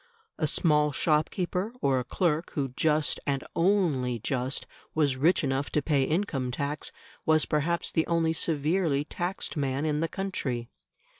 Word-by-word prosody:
A 155 - +2
small 150 -1 +3
shopkeeper, 175 +7 0
or 135 - +2
a - - -2
clerk 165 +4 -1
who 140 -3 -1
just, 150 +4 +1
and 140 -1 0
only 165 -10 +2
just, 125 +4 -2 0.3
was 145 -4 +2
rich 155 +7 +3
enough 135 0 0
to 150 - +2
pay 145 -3 +2
income 155 -6 -1
tax, 140 +4 -2 0.3
was 155 -1 +4
perhaps 165 +3 0
the 160 - +1
only 165 -1 +2
severely 155 -1 +1
taxed 175 +4 -3
man 140 0 -1
in 150 -1 0
the 165 - +1
country. 130 -12 -3
150 Hz, 150 wpm, -28 LUFS, 135-165 Hz, 0.3 s, was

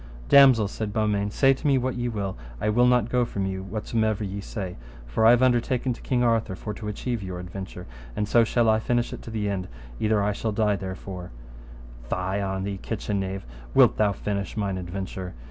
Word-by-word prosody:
Damosel, 130 -6 +7
said 105 +1 -4
Beaumains, 105 -1 0
say 135 -1 +5
to 135 - -3
me 135 -2 +4
what 130 0 0
ye 120 0 -2
will, 100 -4 -3 0.2
I 105 - 0
will 120 +3 +4
not 125 -3 +3
go 125 0 +2
from 100 -4 -2
you 95 0 -3
whatsomever 110 +2 -1
ye 100 0 -4
say, 95 -3 -5 0.3
for 85 - +2
I - - +9
have 120 +1 +5
undertaken 125 0 +2
to - - -13
King 125 -2 +1
Arthur 115 -5 +1
for 105 +2 -5
to 105 +1 -7
achieve 115 +2 -3
your 95 -2 -5
adventure, 90 0 -7 0.3
and 105 - -1
so 115 +2 +5
shall 115 +1 +2
I 110 0 +4
finish 120 +1 0
it - - -7
to - - -9
the 110 -2 -2
end, 95 -2 -2 0.3
either 105 -1 +2
I 105 - +1
shall 110 +2 -2
die 105 -1 +2
therefore. 95 -1 -6 0.8
Fie 95 +2 -1
on 95 -1 -2
thee, 100 0 -3
kitchen 105 -2 -2
knave, 95 0 -4 0.3
wilt - - +6
thou 105 -1 +3
finish 100 +1 -3
mine 100 -3 -1
adventure? 90 -1 -5
105 Hz, 210 wpm, -25 LUFS, 95-115 Hz, 0.8 s, I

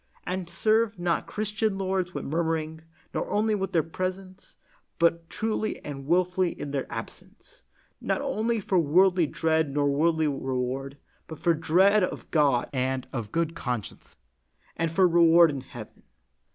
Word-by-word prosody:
And 180 -1 -3
serve 220 +4 +1
not 175 -1 -1
Christian 215 -1 -1
lords 190 -2 -1
with - - -5
murmuring, 160 0 -2 0.3
nor - - -2
only 215 +1 +1
in 200 -2 -1
their 165 -3 +2
presence, 185 +3 -6 0.4
but 170 -1 +1
truly 220 0 -2
and 135 -2 -7
wilfully 180 +1 +1
in 145 - -5
their 140 -2 -3
absence, - - -10 0.4
not - - -1
only 235 -5 -1
for 190 -2 +1
worldly 175 +2 +4
dread 160 0 0
nor 145 0 +1
worldly 160 +2 +2
reward, 135 0 -3 0.3
but 160 - -8
for 170 +2 +2
dread 185 +6 +3
of - - -4
God 140 -6 +2
and 130 0 -1 0.2
good 165 -1 0
conscience, 125 -9 -6 0.6
and 165 0 -1
for 185 +2 +4
reward 170 -1 +6
in 140 -2 -5
heaven. 120 -4 -11
170 Hz, 145 wpm, -26 LUFS, 150-190 Hz, 0.6 s, reward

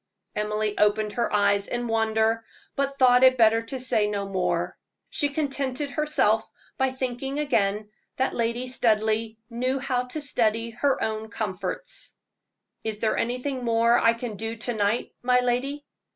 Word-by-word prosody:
Emily 210 0 -1
opened 210 0 +3
her 235 +1 -1
eyes 200 -1 +2
in 240 0 -2
wonder, 225 0 +1 0.3
but 275 0 -1
thought 250 -1 +6
it 260 0 +6
better 225 -1 +5
to 240 +3 -6
say 225 -4 +1
no 200 -1 -2
more. 180 -2 -1 0.4
She 290 -3 +1
contented 280 -1 -2
herself 285 -8 +2 0.3
by 265 0 +1
thinking 260 +1 -3
again 210 -8 +1 0.3
that 265 - +1
Lady 235 +2 -1
Studleigh 220 -2 +1 0.2
knew 255 +3 0
how 255 -2 -1
to 250 +5 -5
study 230 -5 0
her 265 +3 0
own 220 0 -2
comforts. 205 - -4 0.7
"Is 220 -1 -3
there 220 +1 0
anything 250 +2 -2
more 230 0 +3
I 230 - +4
can 230 -3 -5
do 225 +2 -3
to 235 +2 -3
night, 210 +2 0
my 250 0 +4
lady?" 265 +4 -1
230 Hz, 150 wpm, -26 LUFS, 215-255 Hz, 0.7 s, thought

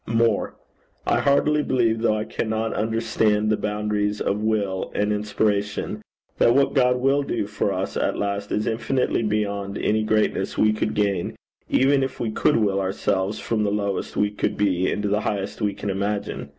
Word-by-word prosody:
More: 115 -2 +1 0.5
I - - +2
heartily 150 +2 +3
believe, 115 -5 +1
though 110 -2 +2
I 105 - -1
cannot 110 0 -2
understand 110 -1 +1
the - - +4
boundaries 105 0 -1
of 100 +2 -1
will 105 -4 -1
and 105 0 +1
inspiration, 105 0 -1 0.4
that 120 - +5
what 140 0 +3
God 125 -2 +4
will 135 +3 +2
do 140 - -2
for 105 0 -1
us 95 0 -3
at - - 0
last 100 0 -2
is 105 - 0
infinitely 115 +3 0
beyond 100 -2 -1
any 110 +1 +1
greatness 110 -2 0
we 110 0 +4
could 110 - -2
gain, 100 -4 0 0.3
even 135 +1 +3
if 135 -1 -3
we 115 - -1
could - - +2
will 100 -3 +1
ourselves 95 +1 -1
from 110 -2 -1
the 105 - +1
lowest 100 -1 -2
we 105 0 +2
could 105 - -2
be, 95 -3 +1
into 105 0 -1
the 105 +1 +1
highest 100 -1 -3
we 105 -1 0
can 100 - -3
imagine. 100 +1 -3
105 Hz, 175 wpm, -23 LUFS, 100-115 Hz, 0.5 s, that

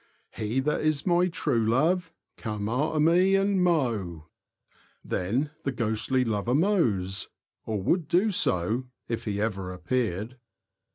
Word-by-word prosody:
He 110 +4 -2
that 150 +3 0
is 155 -2 0
my 180 0 +3
true 125 -9 0
love, 165 +10 +1 0.2
Come 105 -2 -4
after 150 +7 0
me 180 +5 +4
and 195 -1 +2
mow. 110 - 0 0.8
Then 125 +11 -1
the 135 - -1
ghostly 120 +2 0
lover 115 +2 0
mows 120 - +1 0.2
— - - -55
or 110 -2 -1
would 170 - +1
do 190 +7 +3
so 110 - +1 0.2
if 115 - -3
he 100 -2 -2
ever 100 -4 -2
appeared. 110 +4 -2
125 Hz, 135 wpm, -27 LUFS, 105-165 Hz, 0.8 s, me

